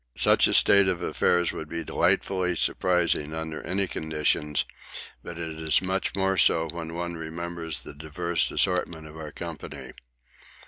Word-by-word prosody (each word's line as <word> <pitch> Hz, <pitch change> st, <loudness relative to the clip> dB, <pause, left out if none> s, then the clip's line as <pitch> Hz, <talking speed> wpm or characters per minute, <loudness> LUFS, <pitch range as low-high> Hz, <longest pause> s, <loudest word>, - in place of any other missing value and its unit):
Such -, -, +5 dB
a -, -, 0 dB
state 100 Hz, -1 st, +6 dB
of 90 Hz, -2 st, -1 dB
affairs 90 Hz, 0 st, +1 dB
would 80 Hz, -, -6 dB
be 85 Hz, 0 st, -4 dB
delightfully 90 Hz, +3 st, +1 dB
surprising 85 Hz, -3 st, +1 dB
under 80 Hz, -1 st, -4 dB
any 95 Hz, +3 st, 0 dB
conditions, 75 Hz, -3 st, 0 dB, 0.6 s
but 85 Hz, -, -8 dB
it 80 Hz, -2 st, -5 dB
is 80 Hz, -1 st, +4 dB
much 95 Hz, +1 st, -1 dB
more 95 Hz, 0 st, +1 dB
so 80 Hz, -2 st, +4 dB
when 85 Hz, -1 st, -6 dB
one 85 Hz, 0 st, -3 dB
remembers 80 Hz, -1 st, -5 dB
the -, -, -8 dB
diverse 80 Hz, +3 st, -1 dB
assortment 85 Hz, -4 st, 0 dB
of 80 Hz, 0 st, -11 dB
our 80 Hz, -2 st, -7 dB
company. 85 Hz, 0 st, -7 dB
85 Hz, 150 wpm, -26 LUFS, 80-90 Hz, 0.6 s, state